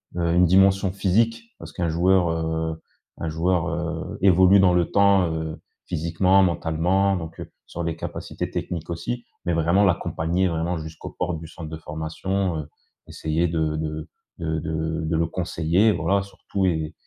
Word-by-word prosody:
une 85 Hz, +1 st, +3 dB
dimension 95 Hz, +2 st, +4 dB
physique. 110 Hz, +5 st, +1 dB, 0.2 s
Parce 85 Hz, -1 st, -9 dB
qu'un 85 Hz, -2 st, -1 dB
joueur, 90 Hz, +2 st, +3 dB
heu, 80 Hz, 0 st, -2 dB, 0.4 s
un 85 Hz, -, -3 dB
joueur, 85 Hz, +1 st, +1 dB
heu, 85 Hz, 0 st, -4 dB
évolue 95 Hz, +1 st, +6 dB
dans 90 Hz, -2 st, +5 dB
le 90 Hz, -1 st, +2 dB
temps, 100 Hz, -4 st, +4 dB
heu, 80 Hz, -1 st, -4 dB, 0.2 s
physiquement, 90 Hz, +4 st, +2 dB
mentalement, 90 Hz, +3 st, +1 dB
donc, 80 Hz, -1 st, -7 dB
heu, -, -, -8 dB, 0.2 s
sur 85 Hz, -, -5 dB
les 85 Hz, -1 st, -2 dB
capacités -, -, -5 dB
techniques 85 Hz, -2 st, -4 dB
aussi. 85 Hz, +9 st, -4 dB, 0.2 s
Mais 85 Hz, -, +1 dB
vraiment 85 Hz, +5 st, +3 dB
l'accompagner, 90 Hz, -1 st, +1 dB
vraiment, 85 Hz, +1 st, -1 dB
jusqu'aux 80 Hz, 0 st, -8 dB
portes 85 Hz, -3 st, -3 dB
du 80 Hz, -, -9 dB
centre 80 Hz, -1 st, -9 dB
de 80 Hz, -, -6 dB
formation, 80 Hz, +4 st, -2 dB
heu. 75 Hz, -, -6 dB, 0.4 s
Essayer 80 Hz, +2 st, -1 dB
de 80 Hz, -2 st, -1 dB
de 75 Hz, 0 st, -4 dB, 0.3 s
de 80 Hz, -1 st, -2 dB
de 80 Hz, +1 st, -2 dB
de 80 Hz, +1 st, 0 dB
le 85 Hz, -, +2 dB
conseiller. 85 Hz, +4 st, +1 dB
Voilà 95 Hz, +4 st, +1 dB
sur 100 Hz, 0 st, -12 dB
tout 95 Hz, -1 st, 0 dB
et 80 Hz, -3 st, -1 dB
85 Hz, 165 wpm, -24 LUFS, 80-95 Hz, 0.4 s, évolue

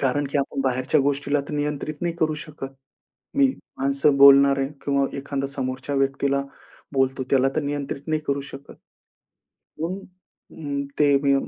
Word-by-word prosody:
कारण 140 Hz, +2 st, +1 dB
की 145 Hz, -, +1 dB
आपण 140 Hz, 0 st, -2 dB
बाहेरच्या 130 Hz, +3 st, +1 dB
गोष्टीला 140 Hz, +1 st, +1 dB
तर -, -, -6 dB
नियंत्रित 150 Hz, +1 st, -2 dB
नाही 170 Hz, -1 st, -1 dB
करू 155 Hz, -2 st, +1 dB
शकत. 150 Hz, -3 st, -7 dB, 0.7 s
मी 280 Hz, -1 st, +6 dB, 0.3 s
माणसं 140 Hz, +1 st, +2 dB
बोलणार 140 Hz, 0 st, +7 dB
आहे 135 Hz, 0 st, 0 dB, 0.2 s
किंवा 140 Hz, -1 st, +2 dB
एखादा 140 Hz, 0 st, -3 dB
समोरच्या 130 Hz, 0 st, -4 dB
व्यक्तीला 135 Hz, 0 st, +1 dB, 0.5 s
बोलतो, 135 Hz, -1 st, +1 dB
त्याला 135 Hz, -1 st, +4 dB
तर 155 Hz, -, +1 dB
नियंत्रित 140 Hz, -1 st, -3 dB
नाही 155 Hz, 0 st, +1 dB
करू 140 Hz, 0 st, 0 dB
शकत. 135 Hz, +1 st, -11 dB, 1.1 s
म्हणून 180 Hz, +5 st, -2 dB, 0.5 s
अ, 140 Hz, -2 st, -4 dB
ते 145 Hz, -1 st, +5 dB
मी 140 Hz, -, +4 dB
140 Hz, 150 wpm, -24 LUFS, 135-145 Hz, 1.1 s, बोलणार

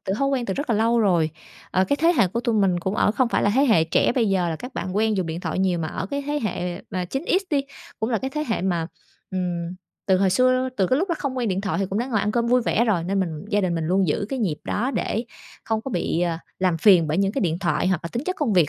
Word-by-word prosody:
từ 190 Hz, -, -1 dB
thói 275 Hz, 0 st, +2 dB
quen 260 Hz, -3 st, -1 dB
từ 190 Hz, -, -1 dB
rất 285 Hz, +2 st, -3 dB
là 225 Hz, -, +3 dB
lâu 230 Hz, +2 st, +3 dB
rồi. 175 Hz, -7 st, +2 dB, 0.4 s
Ờ, 185 Hz, -, +2 dB
cái 285 Hz, +9 st, 0 dB
thế 330 Hz, +3 st, +4 dB
hệ -, -, +5 dB
của 230 Hz, +6 st, -2 dB
tụi 235 Hz, -2 st, 0 dB
mình 190 Hz, -4 st, +2 dB
cũng 190 Hz, +3 st, -2 dB
ở 210 Hz, -, +3 dB
không 250 Hz, +2 st, +1 dB
phải -, -, +1 dB
là 205 Hz, -, +3 dB
thế 275 Hz, +3 st, +4 dB
hệ 195 Hz, -, +4 dB
trẻ 160 Hz, -, +2 dB
bây 235 Hz, -4 st, +1 dB
giờ 185 Hz, -3 st, +1 dB
là 160 Hz, -, -2 dB
các 250 Hz, -, -9 dB
bạn 185 Hz, +1 st, -4 dB
quen 220 Hz, 0 st, +2 dB
dùng 185 Hz, -3 st, -1 dB
điện 165 Hz, +1 st, -4 dB
thoại -, -, -3 dB
nhiều, 185 Hz, -2 st, +1 dB
mà 160 Hz, -, -2 dB
ở 185 Hz, -, -4 dB
cái 280 Hz, +7 st, -3 dB
thế 295 Hz, 0 st, 0 dB
hệ 180 Hz, -3 st, -3 dB
mà 185 Hz, -1 st, -2 dB
9X 290 Hz, -, 0 dB
đi, 285 Hz, -3 st, +3 dB, 0.4 s
cũng 220 Hz, +3 st, -1 dB
là 225 Hz, -, +1 dB
cái 265 Hz, +5 st, -4 dB
thế 300 Hz, +2 st, -2 dB
hệ 225 Hz, -, -1 dB
mà, 175 Hz, -3 st, 0 dB, 0.4 s
ừm, 175 Hz, -2 st, -3 dB, 0.3 s
từ 190 Hz, -, +4 dB
hồi 190 Hz, 0 st, +3 dB
xưa, 255 Hz, +4 st, +3 dB
từ 190 Hz, -, +2 dB
cái 255 Hz, -, +2 dB
lúc 370 Hz, +5 st, 0 dB
nó 340 Hz, -, +1 dB
không 270 Hz, -3 st, -3 dB
quen 245 Hz, -3 st, 0 dB
điện 190 Hz, 0 st, 0 dB
thoại 200 Hz, -1 st, -2 dB
thì 195 Hz, -, 0 dB
cũng 195 Hz, +2 st, -2 dB
đã 240 Hz, -, -1 dB
ngồi 225 Hz, -6 st, 0 dB
ăn 210 Hz, +1 st, -1 dB
cơm 235 Hz, 0 st, +1 dB
vui 250 Hz, +1 st, +3 dB
vẻ 230 Hz, 0 st, +2 dB
rồi. 195 Hz, -8 st, +1 dB
Nên 195 Hz, +2 st, 0 dB
mình 165 Hz, -3 st, -3 dB
gia 205 Hz, -1 st, +2 dB
đình 180 Hz, -3 st, 0 dB
mình 165 Hz, -1 st, -2 dB
luôn 185 Hz, +3 st, +2 dB
giữ 185 Hz, +6 st, 0 dB
cái 270 Hz, -, -3 dB
nhịp 185 Hz, -10 st, 0 dB
đó 245 Hz, +6 st, -1 dB
để 235 Hz, -4 st, -2 dB, 0.4 s
không 220 Hz, -1 st, -1 dB
có 270 Hz, -, -6 dB
bị, 175 Hz, -4 st, -1 dB
ờ, 170 Hz, -2 st, 0 dB, 0.2 s
làm 185 Hz, -3 st, +1 dB
phiền 180 Hz, -3 st, +6 dB
bởi 155 Hz, +3 st, 0 dB
những 195 Hz, 0 st, +1 dB
cái 275 Hz, -, -1 dB
điện 170 Hz, -2 st, 0 dB
thoại 180 Hz, -1 st, 0 dB
hoặc 185 Hz, -4 st, +1 dB
là 170 Hz, -, -4 dB
tính 240 Hz, +4 st, -3 dB
chất 370 Hz, +2 st, -2 dB
công 280 Hz, -8 st, +1 dB
việc. 175 Hz, -6 st, +4 dB
200 Hz, 310 wpm, -23 LUFS, 180-245 Hz, 0.4 s, phiền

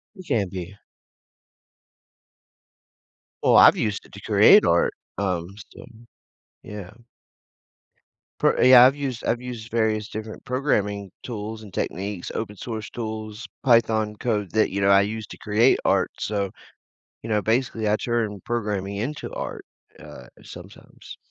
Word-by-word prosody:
It 185 Hz, -2 st, -12 dB
can 100 Hz, -5 st, 0 dB
be. 95 Hz, +2 st, -7 dB, 2.7 s
Well, -, -, +5 dB
I've -, -, +8 dB
used 105 Hz, -2 st, -2 dB
it -, -, -19 dB
to -, -, -10 dB
create -, -, +6 dB
art, -, -, +2 dB, 0.2 s
um, 90 Hz, -2 st, -2 dB, 0.2 s
so, -, -, -12 dB, 0.8 s
yeah. 105 Hz, -3 st, -8 dB, 1.5 s
Per -, -, +3 dB
a 130 Hz, -, +6 dB
I've 125 Hz, +2 st, +8 dB
used 135 Hz, -5 st, -4 dB
I've 120 Hz, +1 st, 0 dB
used 120 Hz, -2 st, -8 dB
various 110 Hz, -2 st, 0 dB
different 110 Hz, 0 st, -8 dB
programming 105 Hz, -7 st, -1 dB
tools 110 Hz, -1 st, -6 dB
and 100 Hz, -4 st, -13 dB
techniques, 95 Hz, 0 st, -4 dB
open 105 Hz, -2 st, -4 dB
source 110 Hz, +1 st, -6 dB
tools, 110 Hz, -1 st, -6 dB, 0.2 s
Python 110 Hz, -4 st, +3 dB
code 105 Hz, -4 st, -2 dB
that, 110 Hz, 0 st, +2 dB
you 100 Hz, -, -3 dB
know, 100 Hz, 0 st, +2 dB
I 100 Hz, 0 st, +6 dB
use 110 Hz, +2 st, -3 dB
to -, -, -11 dB
create 110 Hz, +4 st, +3 dB
art, -, -, +2 dB
so, 100 Hz, -2 st, -2 dB, 0.7 s
you 115 Hz, -, -7 dB
know, 105 Hz, -1 st, +2 dB
basically, 115 Hz, 0 st, 0 dB
I 105 Hz, -, +3 dB
turn 110 Hz, -5 st, -2 dB
programming 105 Hz, -4 st, -3 dB
into 135 Hz, +9 st, -4 dB
art, -, -, -6 dB, 0.3 s
uh, 65 Hz, -, -12 dB, 0.2 s
sometimes. -, -, -13 dB
110 Hz, 140 wpm, -24 LUFS, 100-115 Hz, 2.7 s, I've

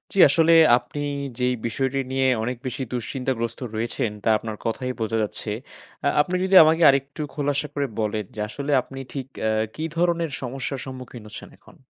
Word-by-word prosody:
জি -, -, +1 dB
আসলে 165 Hz, +4 st, +4 dB, 0.2 s
আপনি 145 Hz, -, -7 dB, 0.4 s
যে 125 Hz, -, -2 dB
এই -, -, 0 dB
বিষয়টি 135 Hz, +3 st, -1 dB
নিয়ে 135 Hz, 0 st, +1 dB, 0.2 s
অনেক 125 Hz, +1 st, -2 dB
বেশি 130 Hz, +2 st, -3 dB
দুশ্চিন্তাগ্রস্ত 120 Hz, -1 st, -3 dB, 0.2 s
রয়েছেন 115 Hz, 0 st, -1 dB
তা -, -, +2 dB
আপনার 110 Hz, 0 st, -6 dB
কথায়ই 125 Hz, +2 st, -2 dB
বোঝা 115 Hz, 0 st, 0 dB
যাচ্ছে। 105 Hz, +1 st, -4 dB, 0.6 s
আ -, -, +4 dB
আপনি 180 Hz, +4 st, -2 dB
যদি 190 Hz, 0 st, +2 dB
আমাকে 160 Hz, +2 st, +3 dB
আরেকটু 140 Hz, +2 st, 0 dB
খোলাসা 145 Hz, 0 st, -1 dB
করে 145 Hz, -1 st, -1 dB
বলেন 105 Hz, -1 st, -1 dB
যে -, -, -7 dB
আসলে 140 Hz, +7 st, -4 dB
আপনি 135 Hz, +1 st, -10 dB
ঠিক 135 Hz, -3 st, -4 dB
অ্যা 110 Hz, -, +1 dB, 0.2 s
কী 155 Hz, -, -4 dB
ধরনের 170 Hz, -2 st, +1 dB
সমস্যার 135 Hz, +1 st, -4 dB
সম্মুখীন 130 Hz, -2 st, -8 dB
হচ্ছেন 105 Hz, -, -9 dB
এখন? -, -, -19 dB
130 Hz, 175 wpm, -24 LUFS, 115-145 Hz, 0.6 s, আসলে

